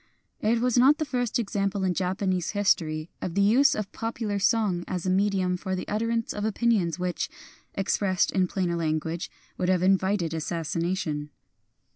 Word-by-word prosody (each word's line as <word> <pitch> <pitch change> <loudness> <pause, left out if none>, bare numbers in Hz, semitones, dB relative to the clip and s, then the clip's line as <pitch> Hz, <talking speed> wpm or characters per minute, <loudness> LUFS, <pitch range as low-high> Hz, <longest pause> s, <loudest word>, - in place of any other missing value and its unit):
It 230 +2 +1
was 250 0 +3
not 275 +4 +6
the 310 - -1
first 245 -5 -1
example 200 -3 -1
in 185 -1 +1
Japanese 185 0 -1
his 205 -1 +5
tory 155 -1 -6
of 175 - -4
the 200 - +3
use 275 +8 +5
of 210 -2 -4
popular 225 -3 -3
song 200 -4 +2
as 180 -1 -3
a 185 - +1
medium 190 -2 +1
for 190 0 -3
the 185 - -5
utterance 230 +2 -1
of 205 - -4
opinions 215 -6 +1
which, 180 -1 -2 0.5
expressed 195 -1 +1
in 185 -1 +2
plainer 180 -2 -1
language, 160 0 -2 0.3
would 180 - 0
have 185 -1 +2
invited 190 -2 +2
assas 165 0 -3
sination. 165 -4 -2
190 Hz, 170 wpm, -26 LUFS, 175-215 Hz, 0.5 s, not